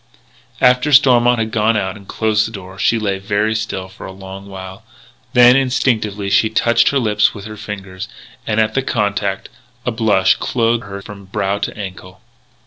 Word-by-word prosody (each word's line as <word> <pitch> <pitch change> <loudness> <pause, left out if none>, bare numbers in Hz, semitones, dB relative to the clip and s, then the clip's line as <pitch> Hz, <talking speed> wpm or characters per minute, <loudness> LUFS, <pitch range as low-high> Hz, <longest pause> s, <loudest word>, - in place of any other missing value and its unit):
After 125 +3 +3
Stormont 125 -3 +5
had 110 -1 -2
gone 110 0 +2
out 95 -1 -2
and 100 -2 -14
closed 110 -1 +1
the - - -9
door, 95 -2 -10
she 115 - +2
lay 100 -3 -1
very 105 +2 0
still 110 -4 -3
for 95 - -11
a - - -8
long 95 +1 -10
while. 95 -1 -9 0.5
Then, 125 0 +7
instinctively, 110 -6 0
she 110 +2 +4
touched 115 +1 +3
her 140 - 0
lips 110 -5 +2
with 100 -1 -9
her 110 0 -8
fingers; 100 -2 -7 0.4
and, 110 0 0
at 110 0 +2
the 135 - +1
contact, 100 -5 -2 0.4
a 125 - 0
blush 110 -4 +2
clothed 115 -2 0
her 100 0 -8
from 100 -2 -11
brow 100 +1 -2
to - - -4
ankle. 95 -1 -8
105 Hz, 180 wpm, -17 LUFS, 95-115 Hz, 0.5 s, Then